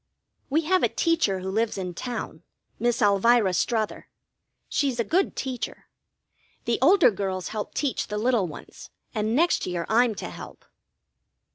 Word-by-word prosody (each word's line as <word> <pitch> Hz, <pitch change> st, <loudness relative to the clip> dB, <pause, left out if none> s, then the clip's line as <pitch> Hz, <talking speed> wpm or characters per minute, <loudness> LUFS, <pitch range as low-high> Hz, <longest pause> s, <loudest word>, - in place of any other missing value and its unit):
We 305 Hz, +4 st, +2 dB
have 370 Hz, +4 st, +2 dB
a -, -, +3 dB
teacher 320 Hz, -, +1 dB
who 190 Hz, +1 st, -4 dB
lives 220 Hz, +2 st, 0 dB
in 180 Hz, -2 st, -4 dB
town, 245 Hz, +7 st, -5 dB, 0.4 s
Miss 240 Hz, 0 st, +1 dB
Elvira 205 Hz, 0 st, +4 dB
Strother. 215 Hz, +4 st, -1 dB, 0.6 s
She's 270 Hz, -4 st, 0 dB
a -, -, +3 dB
good 360 Hz, -, +1 dB
teacher. 255 Hz, -3 st, -5 dB, 0.8 s
The 235 Hz, -, 0 dB
older 340 Hz, -, +6 dB
girls 190 Hz, -2 st, -3 dB
help 215 Hz, -1 st, -5 dB
teach 280 Hz, -6 st, -1 dB
the 210 Hz, -, -4 dB
little 225 Hz, -3 st, +1 dB
ones, 155 Hz, -, -11 dB, 0.2 s
and 215 Hz, 0 st, 0 dB
next 340 Hz, +5 st, +2 dB
year 175 Hz, -2 st, -2 dB
I'm 230 Hz, 0 st, +3 dB
to -, -, -6 dB
help. -, -, -11 dB
230 Hz, 150 wpm, -25 LUFS, 200-260 Hz, 0.8 s, older